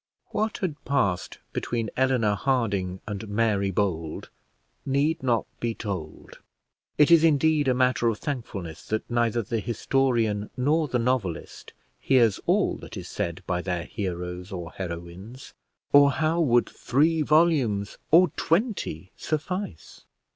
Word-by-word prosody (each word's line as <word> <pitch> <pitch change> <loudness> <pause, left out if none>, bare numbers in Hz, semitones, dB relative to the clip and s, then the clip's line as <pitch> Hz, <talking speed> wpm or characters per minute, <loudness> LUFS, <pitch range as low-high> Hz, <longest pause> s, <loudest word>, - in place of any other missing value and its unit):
What 215 +1 -1
had 170 -6 -3
passed 100 -11 0 0.2
between 115 -3 -2
Eleanor 130 -5 +2
Harding 100 -7 -1
and 105 +1 -5
Mary 105 -2 +1
Bold 85 -5 -2 0.5
need 140 +4 +1
not 120 -4 +1
be 115 -1 -2
told. 90 -8 -6 0.6
It 150 +2 +5
is 165 -1 +7
indeed 155 -1 +3
a 130 - +3
matter 125 -1 +2
of 115 -2 +1
thankfulness 105 - -5
that 110 0 -2
neither 120 -1 +1
the 115 +2 -2
historian 115 -2 0
nor 150 +5 +2
the 125 - 0
novelist 115 -8 -2 0.3
hears 120 -6 +3
all - - +2
that - - -10
is - - -7
said 85 +2 -3
by 90 -1 -1
their 90 -1 -2
heroes 90 -1 -5
or 85 -3 -6
heroines, 95 +8 -8 0.4
or 145 0 +8
how 160 +4 +1
would 120 -6 +3
three 155 +5 +1
volumes 145 -11 +2
or 175 +2 +6
twenty 165 - -1
suffice! 155 - -4
115 Hz, 135 wpm, -26 LUFS, 95-145 Hz, 0.6 s, or